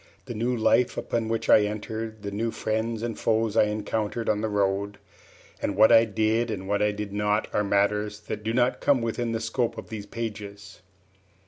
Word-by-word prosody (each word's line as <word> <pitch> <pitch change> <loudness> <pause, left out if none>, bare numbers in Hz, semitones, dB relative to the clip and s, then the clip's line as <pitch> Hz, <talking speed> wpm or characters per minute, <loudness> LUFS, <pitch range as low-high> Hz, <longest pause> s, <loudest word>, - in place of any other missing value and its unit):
The - - -6
new 120 +3 -1
life 120 +2 +2
upon 115 -1 -2
which 115 0 -2
I - - +7
entered, 110 +1 -4
the 100 - -4
new 110 +3 -1
friends 110 +1 -2
and 120 -1 -4
foes 110 -1 +1
I 110 - +5
encountered 105 +2 -2
on 105 -1 +1
the 110 - -1
road, 100 0 0 0.6
and 100 - -1
what 110 - +6
I 115 0 +7
did 110 +2 0
and 95 -3 -4
what 100 +1 0
I 105 - +3
did 105 -1 -6
not, 105 +1 0
are 105 - +2
matters 105 +1 +1
that 105 0 -6
do 110 - -1
not 120 +2 +1
come 135 -4 +3
within 115 +1 -2
the 115 - -1
scope 115 +1 -1
of 110 - -8
these 105 -2 -6
pages. 100 -4 -7
110 Hz, 200 wpm, -26 LUFS, 105-115 Hz, 0.6 s, I